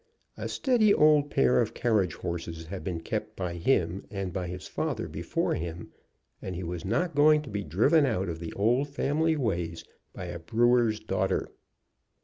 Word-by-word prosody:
A - - -5
steady 240 -6 +3
old 150 -1 +5
pair 65 - +3
of - - -2
carriage 105 -8 +1
horses 85 -1 -5
had 95 +3 -7
been 85 -4 -3
kept - - -4
by 90 -2 -3
him, 85 -1 +1
and 95 -3 -4
by 90 -1 -3
his 90 +1 -7
father - - -2
before - - -2
him, 85 +1 -5 0.5
and 95 - -5
he 90 - -4
was 85 0 -5
not 140 - 0
going 150 +1 +5
to 135 - -9
be 100 0 -2
driven 115 - +3
out 95 -6 -1
of 80 -2 -4
the 80 -1 -6
old 120 +8 +1
family 155 +3 +1
ways 85 - -2 0.3
by 90 - -7
a 85 -1 -6
brewer's 115 +5 +2
daughter. - - -1
95 Hz, 175 wpm, -28 LUFS, 85-140 Hz, 0.5 s, old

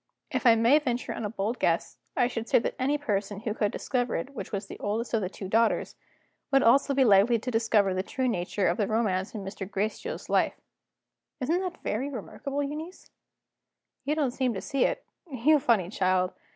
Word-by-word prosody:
If - - +1
I 230 - +8
may 235 +6 +5
venture 250 -5 -2
on 225 - -4
a - - -2
bold 220 +3 -3
guess, - - 0 0.2
I 250 - +4
should 230 -2 -4
say - - +5
that 230 - 0
any 280 +3 +1
person 205 -7 -2
who 220 -2 -2
could 210 -2 0
discover 245 -3 -1
which 260 -8 -8
was 200 0 -3
the - - -10
oldest 225 +4 -2
of 225 - +2
the 185 - -2
two 195 0 -7
daughters, 225 +4 +1 0.6
would 270 -1 +5
be - - +1
also 275 +4 +4
likely 230 -3 +5
to 250 +3 -4
discover 225 -4 +2
the 185 - 0
true 260 +6 -2
nature 185 -2 -1
of 170 - +1
the 205 - +1
romance 215 -2 0
in 205 - -5
Mr. 195 0 -6
Gracedieu's 215 - -3
life.' - - +1 0.8
Isn't 310 +7 +1
that 365 -2 -5
very 255 +7 -1
remarkable, 280 +3 -4
Euneece? 310 +6 -7 0.9
You 300 - 0
don't 290 -5 +1
seem 250 -2 -1
to - - -2
see 275 - +1
it - - -2 0.3
you 280 +4 +4
funny 210 -9 +2
child! 185 -2 +1
230 Hz, 200 wpm, -28 LUFS, 205-270 Hz, 0.9 s, I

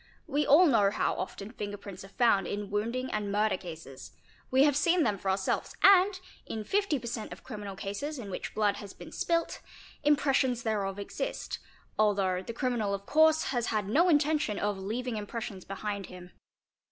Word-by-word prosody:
We 290 +1 0
all 310 +6 +7
know 220 - +4
how - - 0
often 195 +2 -6
finger 205 -4 -5
prints. 200 -2 -9
are - - -10
found 195 -3 +2
in 205 0 -4
wounding 235 +5 -1
and 210 -1 -2
murder 210 +1 +2
cases; 160 -7 -9 0.4
we 260 +1 +5
have 290 -2 +4
seen 335 +3 +3
them 205 -6 0
for 195 - -2
ourselves 190 0 -1
and, 385 0 +6 0.3
in 220 - -4
50 395 - +1
per 240 - -9
cent. 235 -2 -4
of - - -10
criminal 205 -5 -7
cases 205 +11 -4
in 210 -6 -7
which - - -5
blood 210 -2 +2
has 200 -1 -9
been - - -11
spilt, 335 -1 -1 0.4
impressions 270 -4 +2
thereof 200 -3 -1
exist, - - -4 0.4
although 195 -4 +2
the 230 - -6
criminal 230 -4 -1
of 200 0 -9
course 315 +3 +4
has 240 -3 0
had 210 -3 -1
no 325 - +4
intention 295 -7 +2
of 205 -1 -1
'leaving 225 +4 -3
impressions 205 -2 -6
behind 200 0 -4
him." 180 0 -11
215 Hz, 180 wpm, -30 LUFS, 200-275 Hz, 0.4 s, all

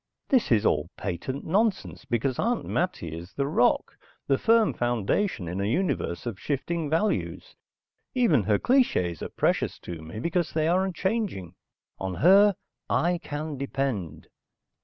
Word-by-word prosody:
This 260 - +2
is 110 -2 +4
all 75 +2 +1
patent 100 +9 -4
nonsense 200 -4 0
because 130 0 -1
Aunt 235 +1 0
Mattie 85 - -2
is 85 +3 -9
the 140 - -1
rock, 140 -4 +2 0.3
the 135 - +1
firm 225 -1 +4
foundation 120 - -1
in 90 +3 -3
a - - 0
universe 125 - -1
of 110 -6 -4
shifting 155 +2 -2
values. 165 +8 -1 0.6
Even 225 - +4
her 105 -1 +3
clichés 95 - +2
are - - -4
precious - - 0
to 85 -2 -7
me 80 +7 -8
because 170 +5 -1
they 155 0 +1
are 185 +3 +3
unchanging. 190 - -2 0.5
On 95 -1 -3
her, 195 - +6 0.3
I 175 +1 +1
can 150 -2 -5
depend. 135 - -3
140 Hz, 145 wpm, -26 LUFS, -, 0.6 s, her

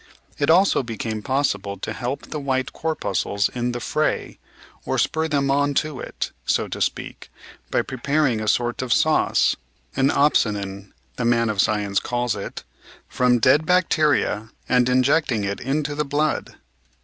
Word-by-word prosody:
It 145 - +1
also 185 +1 +5
became 110 -2 -4
possible 105 -6 -1
to - - -5
help 125 +3 -4
the 155 - -3
white 135 -1 -1
corpuscles 100 - -1
in 125 0 -2
the 120 - -4
fray, - - -1 0.4
or - - -2
spur 160 0 +1
them 140 -3 +1
on 145 0 +1
to 150 -3 -1
it, - - -5
so - - 0
to - - -5
speak, - - -3 0.4
by - - +1
preparing 135 -2 0
a 110 - -4
sort 120 +3 +1
of 130 -2 -4
sauce - - +3 0.2
— - - -32
an 135 +1 +3
opsonin, 100 -9 +1 0.3
the 125 - -1
man 115 -1 +2
of 100 -2 +2
science 105 -2 +1
calls 120 -1 -1
it 100 - -6 0.2
— - - -20
from 125 -1 +2
dead 130 +6 +4
bacteria 155 - +2 0.2
and 125 0 +3
injecting 130 -2 +2
it 100 0 -2
into 145 +3 -2
the 150 +1 -1
blood. 150 +2 -1
125 Hz, 160 wpm, -22 LUFS, 110-145 Hz, 0.4 s, also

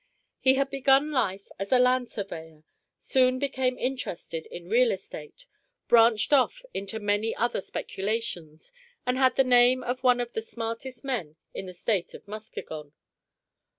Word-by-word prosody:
He 265 0 +4
had 275 0 0
begun 275 +2 +3
life 200 -8 -1
as 195 0 -4
a 255 - +6
land 250 -1 +3
surveyor, 160 -6 -7 0.3
soon 255 -1 +2
became 260 -2 -1
interested 270 - -4
in 480 - -10
real 485 +2 +4
estate, - - -8 0.4
branched 230 +2 +5
off 395 - +3
into 200 +3 -4
many 205 +2 0
other 240 -3 0
speculations, 190 - -4 0.3
and 250 - +1
had 260 -1 +4
the 270 - +5
name 250 0 +5
of 245 +1 -3
one 250 -2 +4
of 240 0 -3
the 220 - -2
smartest 230 +4 -6
men 215 - -3 0.2
in 190 - -6
the 185 - -8
State 190 0 -1
of - - -13
Muskegon. 160 -8 -8
245 Hz, 150 wpm, -27 LUFS, 205-260 Hz, 0.4 s, a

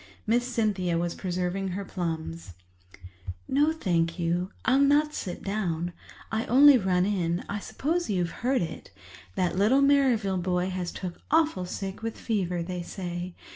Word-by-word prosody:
Miss 240 +3 +2
Cynthia 200 -7 0
was 170 0 -1
preserving 185 +1 -2
her 195 +2 -4
plums. 165 - -4 0.9
"No, 290 +3 +3
thank 170 - 0
you, 175 +1 0 0.2
I'll 260 +2 +4
not 290 +2 +4
sit 180 -10 -5
down—I 195 +3 -3
only 280 +3 +8
run 185 -5 +2
in—I 190 0 -1
suppose 330 +10 -2
you've 180 -4 -2
heard 255 -3 +2
it. 165 - -7 0.5
That 180 0 0
little 255 +8 +4
Merrivale 255 -9 +3
boy 180 +1 0
has 180 -1 -3
took 180 -2 -7
awful 315 - +2
sick 195 +2 -5
with 225 0 -4
fever, 180 -6 -1
they 180 0 -4
say. 175 0 -5
190 Hz, 140 wpm, -27 LUFS, 175-235 Hz, 0.9 s, only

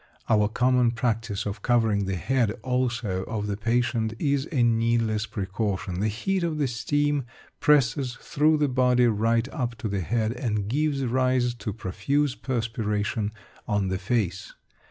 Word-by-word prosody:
Our 105 -1 +4
common 125 0 +2
practice 115 -3 -1
of 105 +1 -4
covering 110 -4 +2
the 95 0 -2
head 120 +6 +1
also 120 -7 -1
of 110 -2 -3
the 105 -1 -2
patient 115 +1 0
is 140 0 0
a 130 -6 +2
needless 115 -2 +1
precaution. 95 -2 -3
The 105 - +1
heat 185 - -1
of 165 -2 -1
the 145 -2 +1
steam 145 +4 0 0.3
presses 130 -3 +2
through 155 +2 +2
the 150 -1 +2
body 125 -1 +3
right 115 +1 +2
up 125 -6 -3
to 115 - -4
the 100 -2 -1
head, 110 +4 0
and 105 -5 -2
gives 140 +2 0
rise 125 0 +1
to 120 -2 -5
profuse 115 +8 -1
perspiration 110 -4 -2 0.4
on 100 -2 0
the 95 0 -1
face. 100 -2 -2
115 Hz, 155 wpm, -26 LUFS, 105-130 Hz, 0.4 s, Our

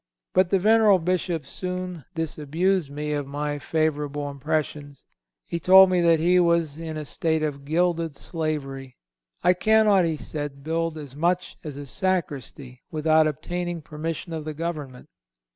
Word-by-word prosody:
But 185 -1 +4
the 195 - +3
venerable 215 0 +5
Bishop 175 -3 -1
soon 180 0 -5
disabused 165 +2 0
me 150 +1 -3
of 145 -2 -2
my 145 +1 -3
favorable 145 -2 -1
impressions. 145 0 -3 0.4
He 170 - -3
told 190 +1 +8
me 180 -1 +3
that 165 -1 +4
he 180 +3 +4
was 170 -3 +2
in 160 -1 -5
a 155 - -5
state 160 +4 -1
of 140 -2 -3
gilded 165 0 0
slavery. 135 -6 -4 0.5
I 180 - +5
cannot, 210 -1 +4
said 145 -1 -4
he, - - -20
build 165 +1 -1
as 145 -3 -9
much 175 +4 0
as 150 -4 -7
a 145 - -7
sacristy 140 - -3
without 155 0 +3
obtaining 175 +2 -4
permission 160 +2 -5
of 160 -1 -4
the 155 0 -5
government. 150 -6 -5
160 Hz, 150 wpm, -25 LUFS, 145-175 Hz, 0.5 s, told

